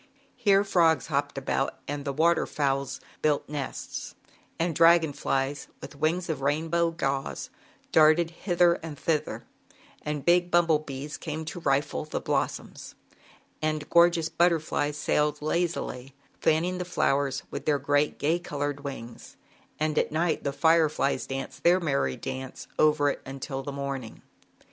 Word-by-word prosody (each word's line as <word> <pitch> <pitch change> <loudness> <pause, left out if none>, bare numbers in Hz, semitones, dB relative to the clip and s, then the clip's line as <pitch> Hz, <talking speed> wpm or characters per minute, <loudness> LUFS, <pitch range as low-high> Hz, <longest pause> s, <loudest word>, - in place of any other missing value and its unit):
Here 200 -5 +4
frogs 165 - +3
hopped 140 0 0
about 135 0 -1
and 145 0 -4
the 140 - -1
water 165 +4 +2
fowls 140 -2 -1 0.2
built 150 -2 +1
nests, 145 -3 -5 0.4
and 165 0 0
dragon 165 -2 +5
flies 135 +1 -1
with - - -10
wings 160 +5 0
of 155 -5 -3
rainbow 160 +4 +1
gauze 135 -5 -3 0.4
darted 160 +2 +5
hither 175 -1 +2
and 160 -3 -7
thither, 155 0 -1 0.6
and 150 -2 -4
big 175 0 +4
bumble 170 -3 +4
bees 145 0 -6
came 160 0 -5
to 160 +2 -6
rifle 140 -1 0
the 155 - -3
blossoms, - - -3 0.7
and 155 -1 -2
gorgeous 170 -1 +5
butterflies 160 -3 +1
sailed 150 0 +1
lazily, 150 -5 -2 0.2
fanning 175 +4 +1
the - - -1
flowers 140 -6 0
with - - -6
their 150 -2 +3
great 145 +2 +1
gay 160 +4 +1
colored 145 -4 -3
wings, 135 -5 -8 0.4
and 155 0 +1
at - - -1
night 160 +1 0
the 140 - -1
fireflies 155 -1 +2
danced 135 0 -5
their 175 +2 +5
merry 140 -6 0
dance 130 0 -6
over 150 -2 +4
it - - -7
until 135 0 -5
the 140 - -5
morning. 140 -4 -5
150 Hz, 145 wpm, -27 LUFS, 140-170 Hz, 0.7 s, dragon